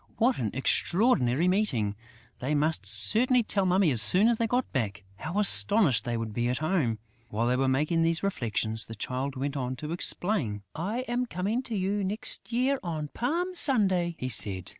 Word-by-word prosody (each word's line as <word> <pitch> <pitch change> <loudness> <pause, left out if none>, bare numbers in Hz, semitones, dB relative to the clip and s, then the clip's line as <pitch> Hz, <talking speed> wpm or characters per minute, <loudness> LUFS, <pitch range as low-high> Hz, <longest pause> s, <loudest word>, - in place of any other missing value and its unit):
What 245 +3 +1
an 110 - -2
extraordinary 160 - +1
meeting! 130 - 0 0.4
They 140 +4 -2
must 150 -7 -1
certainly 225 - +4
tell 200 -3 -1
Mummy 180 -2 +2
as 120 -4 +3
soon 185 - +5
as 235 -1 +1
they 230 - 0
got 245 +2 -2
back! 105 -5 -3
How 160 - -6
astonished 200 - +2
they 120 -1 -2
would 115 -2 -5
be 120 +2 -1
at 125 - -1
home! 155 - -1 0.3
While 110 +2 -2
they 125 +1 +1
were 135 +1 0
making 150 +5 0
these 165 +1 +1
reflections, 115 - -2
the 115 - -9
Child 130 +6 -4
went 140 +2 -4
on 130 -2 -3
to 150 +4 -7
explain: 170 - -2
"I 205 +10 -3
am 250 0 -3
coming 205 +5 -2
to 240 -4 -6
you 200 +1 -2
next 210 +4 -2
year, 255 +3 0
on 155 -5 -5
Palm 340 - -3
Sunday," 190 - +4
he 130 - -5
said. 95 -5 +3
165 Hz, 185 wpm, -27 LUFS, -, 0.4 s, soon